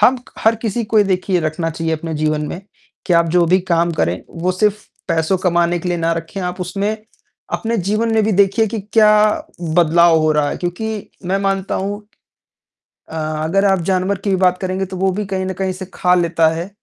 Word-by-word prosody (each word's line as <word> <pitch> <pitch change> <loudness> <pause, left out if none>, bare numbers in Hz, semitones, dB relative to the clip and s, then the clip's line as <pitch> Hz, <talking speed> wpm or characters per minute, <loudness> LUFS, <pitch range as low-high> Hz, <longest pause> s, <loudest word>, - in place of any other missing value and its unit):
हम 245 +5 +5 0.2
हर 220 +1 +3
किसी 230 +1 -1
को 215 +1 +2
ये 205 - +5
देखिए 185 -1 0
रखना 160 +1 -2
चाहिए 165 0 -3
अपने 160 0 -3
जीवन 155 0 -1
में, 175 - -6 0.5
कि 180 - +1
आप 170 -1 +4
जो 175 0 +4
भी 185 +3 +4
काम 170 -2 +1
करें, 90 - -1
वो 180 +2 -2
सिर्फ़ 210 +2 0 0.2
पैसों 165 +2 +1
कमाने 175 -1 +1
के 180 - -4
लिए 175 -1 -1
न 165 - -3
रखें, 165 +4 -6
आप 180 0 -4
उसमें 195 +4 -2 0.6
अपने 230 0 -1
जीवन 220 +3 +1
में 220 - +3
भी 215 - +1
देखिए 200 +3 +3
कि 220 +1 -4
क्या 215 -2 +6 0.7
बदलाव 170 0 +5
हो 155 0 +2
रहा 150 -1 +1
है - - -4
क्योंकि 210 +4 -4 0.2
मैं 190 +2 +1
मानता 195 -1 -1
हूँ, 200 +2 -3 1.1
अ, - - -8
अगर 155 +5 0
आप 195 -2 +3
जानवर 190 +1 +1
की 200 - -3
भी 195 - +3
बात 180 -1 +2
करेंगे 185 0 -2
तो 185 0 -7
वो 190 +1 +1
भी 205 +3 -3
कहीं 190 -1 -3
न 190 - -3
कहीं 190 -1 -1
से 190 +1 -7
खा 180 0 +2
लेता 165 -2 +2
है 170 +3 -5
185 Hz, 215 wpm, -18 LUFS, 170-200 Hz, 1.1 s, क्या